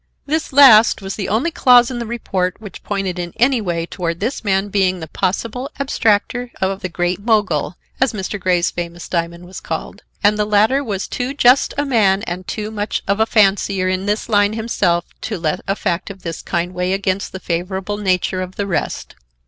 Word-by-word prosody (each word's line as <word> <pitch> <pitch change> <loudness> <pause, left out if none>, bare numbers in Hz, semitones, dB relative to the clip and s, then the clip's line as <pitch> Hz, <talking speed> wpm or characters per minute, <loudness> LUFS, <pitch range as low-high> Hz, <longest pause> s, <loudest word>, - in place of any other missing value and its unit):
This 315 +2 -1
last 235 -7 +7
was 195 0 -4
the 200 - -4
only 245 +11 +1
clause 250 -6 +5
in 245 - -4
the 235 - -4
report 190 -6 -2
which 205 -5 -10
pointed 195 -3 -3
in 175 -1 -5
any 245 0 +3
way 170 -4 -2
toward 170 -1 -4
this 230 +6 -2
man 195 -1 +1
being 185 -2 +1
the 160 - -7
possible 225 - -2
abstractor 245 -2 +1
of 190 +1 -1
the 185 - -3
Great 175 +1 -1
Mogul, 205 -8 +1 0.2
as 260 -1 +3
Mr. 210 0 -4
Grey's 180 -2 +1
famous 175 0 -6
diamond 170 0 -3
was 185 +2 -9
called, - - -5 0.2
and 210 +1 +3
the 210 - +2
latter 215 +7 +3
was 205 -6 -3
too 255 +3 -3
just 255 -1 +4
a 290 - +1
man 210 -7 +2
and 180 -2 -5
too 215 0 -4
much 210 -1 -3
of 200 +2 +1
a 220 - +3
fancier 195 -3 +2
in 185 +1 -2
this 210 +1 -1
line 205 -1 +3
himself 205 -6 0 0.2
to - - -3
let 160 -3 -1
a 195 - +1
fact 175 -2 -2
of 195 -1 -10
this 165 -2 -5
kind 175 +1 -2
weigh 180 +1 -1
against 195 0 -1
the 190 - -7
favorable 190 +4 -3
nature 185 -2 0
of 185 0 -6
the 200 - -2
rest. 190 -5 -3
195 Hz, 200 wpm, -19 LUFS, 180-220 Hz, 0.2 s, last